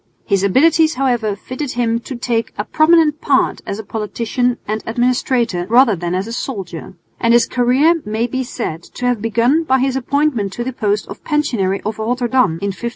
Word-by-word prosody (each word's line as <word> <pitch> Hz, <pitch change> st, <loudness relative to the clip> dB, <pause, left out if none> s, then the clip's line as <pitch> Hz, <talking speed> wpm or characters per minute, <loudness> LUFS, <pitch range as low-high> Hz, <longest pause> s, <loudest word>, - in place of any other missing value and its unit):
His 195 Hz, -1 st, +1 dB
abilities, 310 Hz, -, +3 dB
however, 240 Hz, -6 st, 0 dB
fitted 255 Hz, +6 st, -6 dB
him 230 Hz, -1 st, 0 dB
to 255 Hz, +2 st, -8 dB
take 235 Hz, -1 st, -2 dB
a 205 Hz, -, -2 dB
prominent 310 Hz, -1 st, +3 dB
part 275 Hz, -3 st, +1 dB
as 200 Hz, -, -3 dB
a 220 Hz, -, -6 dB
politician 230 Hz, +4 st, -2 dB
and 215 Hz, +1 st, -2 dB
administrator 240 Hz, -5 st, 0 dB
rather 235 Hz, -2 st, +5 dB
than 175 Hz, +1 st, -3 dB
as 190 Hz, +1 st, -1 dB
a 230 Hz, -, -6 dB
soldier; 190 Hz, -7 st, -6 dB, 0.2 s
and 230 Hz, 0 st, +3 dB
his 240 Hz, -1 st, +5 dB
career 265 Hz, +7 st, +2 dB
may 215 Hz, +2 st, -1 dB
be 260 Hz, +2 st, -2 dB
said 165 Hz, -9 st, -5 dB
to 250 Hz, -, -4 dB
have 245 Hz, -4 st, +1 dB
begun 235 Hz, +8 st, +2 dB
by 265 Hz, -4 st, +2 dB
his 265 Hz, 0 st, 0 dB
appointment 265 Hz, -6 st, 0 dB
to 240 Hz, -, -3 dB
the 260 Hz, +1 st, -4 dB
post 210 Hz, -3 st, -1 dB
of -, -, -10 dB
Pensionary 230 Hz, -11 st, 0 dB
of 215 Hz, +1 st, -3 dB
Rotterdam 245 Hz, -2 st, +1 dB
in 200 Hz, -, -1 dB
1576. 235 Hz, +6 st, -4 dB
240 Hz, 190 wpm, -17 LUFS, 210-260 Hz, 0.2 s, rather